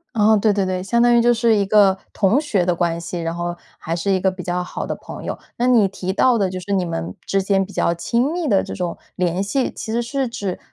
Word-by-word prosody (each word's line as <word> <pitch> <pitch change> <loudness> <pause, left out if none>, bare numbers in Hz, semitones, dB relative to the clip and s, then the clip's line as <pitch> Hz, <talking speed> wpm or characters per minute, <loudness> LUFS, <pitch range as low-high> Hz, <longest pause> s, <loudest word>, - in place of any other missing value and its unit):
哦， 215 0 +5
对 210 +1 +3
对 200 -1 0
对， 185 0 -2
相 235 +5 +1
当 240 0 +5
于 235 - +5
就 240 +1 +4
是 230 -1 +3
一 200 -1 +2
个 195 -2 +4
同 215 +7 +2
学 200 - 0
的 180 - +1
关 170 -1 0
系， 170 0 -5
然 165 0 -2
后 175 0 -3 0.2
还 165 +1 -3
是 195 +4 -1
一 190 - +2
个 190 +1 +2
比 185 -1 -7
较 180 0 -1
好 - - -5
的 - - -3
朋 - - -10
友。 - - -4 0.2
那 245 +1 +1
你 230 -6 +5
提 190 -1 -4
到 240 +5 +3
的 195 -3 +1
就 185 0 -5
是 200 +2 -4
你 190 - +2
们 90 - -4
之 195 - +1
间 195 0 +1
比 200 - -13
较 170 - +1
亲 235 - 0
密 345 -2 -2
的 200 -6 +3
这 - - -6
种 175 -2 -3 0.2
联 180 0 0
系， 255 +7 -1
其 - - -7
实 235 +1 0
是 265 +2 -2
指 205 -5 -4
195 Hz, 290 characters per minute, -20 LUFS, 180-230 Hz, 0.2 s, 哦